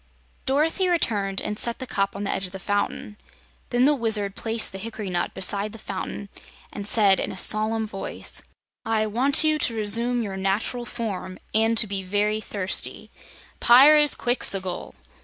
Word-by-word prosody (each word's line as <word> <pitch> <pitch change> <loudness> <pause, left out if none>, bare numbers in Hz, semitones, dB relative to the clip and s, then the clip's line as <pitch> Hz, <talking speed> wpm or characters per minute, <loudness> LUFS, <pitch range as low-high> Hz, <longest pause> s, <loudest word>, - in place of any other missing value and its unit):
Dorothy 315 +7 +1
returned 205 - 0
and 210 0 -4
set 235 -1 +1
the 260 - -6
cup 195 -5 -2
on 200 - -5
the 200 - -2
edge 190 - -2
of 180 - -15
the - - -5
fountain. 205 +2 -3 0.5
Then 245 +1 +2
the 295 - +4
Wizard 215 -6 +1
placed 225 0 0
the 195 - -7
hickory 215 -2 -6
nut 175 -1 -2
beside 200 +3 0
the - - -9
fountain 200 0 -6 0.4
and 205 -1 -6
said 205 -3 +4
in - - -3
a - - -8
solemn 220 +3 +3
voice: 195 -2 -2 0.4
"I 225 -2 0
want 255 +8 +2
you 310 -1 +2
to 235 - 0
resume 230 +3 +1
your 195 -3 -5
natural 205 +5 -2
form, 200 -6 -5 0.2
and 225 +1 +2
to 220 - +5
be 200 -1 -3
very 205 +3 -1
thirsty 200 -3 -1 0.5
Pyrzqxgl!" 245 -8 +4
215 Hz, 165 wpm, -24 LUFS, 195-240 Hz, 0.5 s, to